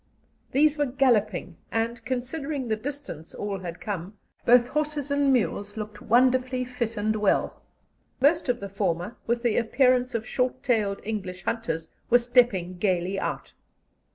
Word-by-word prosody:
These 300 +2 +3
were 290 - +2
galloping, 215 -9 +1
and, 230 +1 -1
considering 265 +2 -3
the 220 - +2
distance 250 - -7
all 200 -1 -3
had 175 -2 -7
come, 200 -1 -5 0.3
both 240 0 +6
horses 300 -1 -2
and 285 -1 +3
mules 205 -4 0
looked 210 -1 -6
wonderfully 255 +1 +3
fit 240 -2 -3
and 215 +1 +1
well. 210 -2 +1 0.6
Most 290 +2 +3
of 245 -2 0
the 200 - -4
former, 190 +1 -2
with 235 +1 0
the 235 -3 +2
appearance 250 +1 +3
of 220 -1 -2
short 255 0 -1
tailed 210 -5 +1
English 185 -4 -4
hunters, 165 -9 -2 0.2
were 245 - +7
stepping 235 -8 +2
gaily 185 0 0
out. - - -4
235 Hz, 150 wpm, -26 LUFS, 200-255 Hz, 0.6 s, were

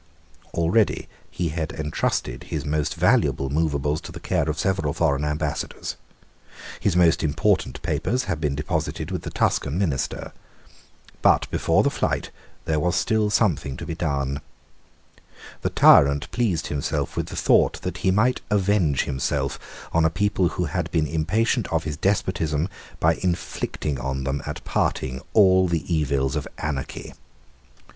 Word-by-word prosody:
Already 90 +6 +2 0.2
he 85 -2 -2
had 80 -1 -3
entrusted 70 -4 -2
his 75 -1 -4
most 75 0 -1
valuable 85 - +2
moveables 75 -1 0
to - - -9
the - - -8
care - - 0
of 75 - -2
several 85 -6 0
foreign 75 -4 +1
Ambassadors. 75 +1 -3 0.8
His 95 - +1
most 85 -2 +4
important 80 +7 +1
papers 125 +2 0
had 80 -10 -3
been 75 -3 0
deposited 75 +2 -2
with - - -2
the - - -6
Tuscan 70 +4 0
minister. 80 -9 -2 0.9
But - - +4
before - - +2
the - - +2
flight - - -1 0.3
there 80 -1 +1
was 90 +3 +1
still 110 -1 +2
something 80 - +1
to 85 - -6
be 85 - -4
done. 70 -4 -2 1.2
The - - 0
tyrant 70 +1 +5
pleased 105 -10 0
himself 75 -1 -2
with - - -2
the - - -7
thought - - +3
that - - -3
he - - +1
might 105 +7 +2
avenge 100 -8 +2
himself 70 0 -2 0.3
on 85 - +3
a 80 - +4
people 95 +2 +1
who 90 - -2
had 80 +2 -2
been 80 -2 +1
impatient 95 - 0
of 80 -1 0
his 75 -1 -3
despotism 80 -2 0 0.3
by 80 +1 +3
inflicting 85 -5 -2
on 65 +1 -3
them 70 +1 -2
at - - -5
parting 65 0 -1
all 95 -3 +6
the 85 +1 -1
evils 70 -4 +1
of 75 -3 -2
anarchy. 70 -3 -4
80 Hz, 150 wpm, -24 LUFS, 70-90 Hz, 1.2 s, all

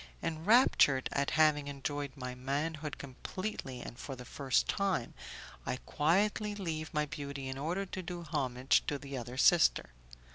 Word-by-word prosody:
Enraptured 160 - +4
at 140 0 +1
having 150 -2 +4
enjoyed 145 0 -3
my 125 -2 -5
manhood 145 +4 -3
completely 140 - -5
and 120 - -9
for 135 - -6
the 125 0 -10
first 135 0 +1
time, 195 - 0 0.5
I - - -1
quietly 205 +7 +1
leave 160 -6 -4
my 150 0 +1
beauty 140 -2 -5
in 130 0 -4
order 175 +7 -1
to 185 0 -5
do 175 -1 -6
homage 130 -5 +1
to 145 - 0
the 140 0 -7
other 125 0 -6
sister. 165 - +5
145 Hz, 150 wpm, -33 LUFS, 135-170 Hz, 0.5 s, sister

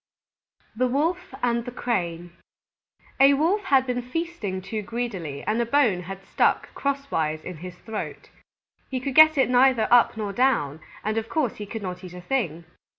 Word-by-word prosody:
_ - - -36
THE 255 +3 +2
WOLF 325 +8 -1
AND 235 -1 +1
THE - - -4
CRANE 175 -9 -2 0.9
A 275 +1 +7
Wolf 365 +8 +1
had 270 -6 +4
been 250 -1 -1
feasting 250 - -4
too 210 +4 -4
greedily, 200 -11 -4
and 220 +2 0
a - - +1
bone 235 -9 +3
had 195 +2 -8
stuck - - +1
crosswise 270 - -2
in 180 -3 -7
his 180 +2 -8
throat. 220 +2 -7 0.6
He 260 - -2
could 270 +1 -4
get 310 +1 +8
it 265 - +4
neither 250 -2 +4
up 240 -2 +5
nor 205 -2 -3
down, 195 - +1 0.2
and 215 +1 0
of 225 - -8
course 295 -8 -1
he 210 - -7
could 220 0 -6
not 180 0 -5
eat 180 -1 -9
a 180 - -8
thing. 175 - -2
235 Hz, 180 wpm, -25 LUFS, 185-270 Hz, 0.9 s, get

